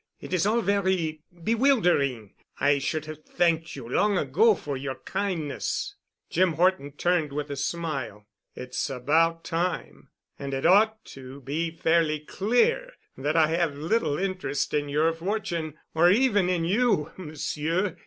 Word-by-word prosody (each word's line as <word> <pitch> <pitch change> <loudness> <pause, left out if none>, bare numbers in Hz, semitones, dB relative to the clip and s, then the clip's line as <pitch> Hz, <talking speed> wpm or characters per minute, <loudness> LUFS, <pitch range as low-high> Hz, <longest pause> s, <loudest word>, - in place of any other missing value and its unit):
It - - -8
is 185 +1 +2
all 230 +2 +2
very 190 -7 0 0.2
bewildering. 180 - +2 0.3
I 145 0 +3
should 155 +3 -2
have 155 0 -9
thanked 165 -1 0
you 130 -4 -8
long 200 - +2
ago 180 - +3
for 145 -5 -5
your 135 0 -4
kindness." 195 - -3 0.3
Jim 185 -2 +2
Horton 165 -4 +1
turned 165 -1 0
with 145 0 -4
a - - -3
smile. 135 -8 -4 0.3
"It's 125 +3 -4
about 160 +6 +1
time. 175 +1 -3 0.3
And 140 -1 -4
it 135 - -3
ought 215 +5 +4
to 135 +1 -10
be 155 +6 -2
fairly 160 -1 +1
clear 245 - +1 0.2
that 145 +4 -2
I 160 -2 +4
have 165 -3 0
little 160 -1 0
interest 185 -8 -2
in 145 -1 0
your 155 +3 +2
fortune 170 -3 -3 0.2
or 170 +2 +5
even 205 -3 +3
in 175 -2 0
you, 200 -5 +1
Monsieur. 165 +2 -2
165 Hz, 145 wpm, -26 LUFS, 145-190 Hz, 0.3 s, or